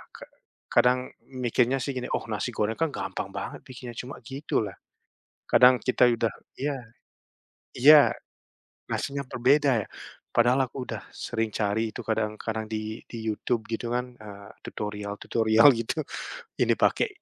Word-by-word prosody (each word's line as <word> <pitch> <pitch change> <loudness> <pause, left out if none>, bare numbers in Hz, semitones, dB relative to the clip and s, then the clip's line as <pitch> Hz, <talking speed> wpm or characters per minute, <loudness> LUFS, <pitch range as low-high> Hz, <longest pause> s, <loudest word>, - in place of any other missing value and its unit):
ka - - -10 0.5
kadang 125 +1 +3 0.2
mikirnya 125 0 +1
sih 140 - -3
gini, 125 - -3
"Oh, - - -3
nasi 105 +4 -2
goreng 110 +1 0
kan 165 -1 +2
gampang 95 -1 -4
banget - - -5
bikinnya 125 -2 -9
cuma 125 +3 -6
gitulah", 135 -6 -2 0.8
kadang 125 0 +7
kita 125 -1 +4
udah 115 -2 +1 0.3
iya, 145 0 0 1.0
iya 145 +3 +8 0.8
nasinya 140 0 -2
berbeda, 140 +3 +3
ya? - - -16 0.5
Padahal 125 +2 +3
aku 130 -2 -6
udah 110 -3 -5
sering 115 -2 -3
cari 110 +1 0
itu - - -7
kadang-kadang 110 0 -2
di 110 0 -4
di 115 -2 -6
YouTube 110 +1 -1
gitu 115 +1 -3
kan, 125 0 -3
eee, 100 -2 -11 0.2
tutorial-tutorial 105 +3 +1
gitu 145 +6 -2 0.6
ini - - +4
pakai, - - +2
120 Hz, 135 wpm, -27 LUFS, 110-130 Hz, 1.0 s, iya